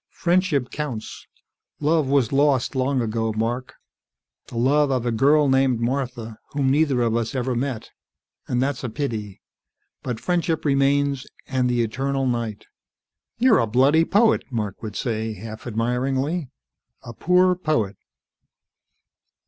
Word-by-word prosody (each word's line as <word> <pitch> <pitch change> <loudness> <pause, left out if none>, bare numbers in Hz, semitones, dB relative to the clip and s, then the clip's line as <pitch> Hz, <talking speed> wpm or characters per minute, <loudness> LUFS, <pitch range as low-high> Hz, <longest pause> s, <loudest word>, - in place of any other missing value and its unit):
Friendship 175 -7 +1
counts. 135 -8 -6 0.5
Love 155 -1 +2
was 135 -4 +2
lost 140 -2 +2
long 130 0 0
ago, 115 0 -1
Mark. 120 +4 -3 0.7
The 115 - -8
love 140 +4 +3
of 130 -3 0
a 120 - +1
girl 145 +6 +4
named 135 -2 +2
Martha, 120 -3 -3
whom 135 -2 +1
neither 140 -4 +2
of 115 -1 +1
us 115 +3 -2
ever 130 0 -1
met. 125 -1 -3 0.6
And 125 - 0
that's 140 0 -2
a 125 - -2
pity. 110 - -4 0.6
But 125 -4 -4
friendship 170 -3 -1
remains, 140 -1 +1 0.2
and 130 -2 0
the 120 -1 +1
eternal 135 +4 -1
night." 115 -4 -2 0.7
"You're 245 0 +4
a 115 - +1
bloody 135 +8 +4
poet," 215 +6 +3
Mark 105 -5 -3
would 110 -3 -6
say, 110 -3 -2
half 110 +3 -9
admiringly. 130 +7 -1 0.5
"A 120 - -9
poor 180 +7 +3
poet." 155 - -1
130 Hz, 135 wpm, -23 LUFS, 115-145 Hz, 0.7 s, girl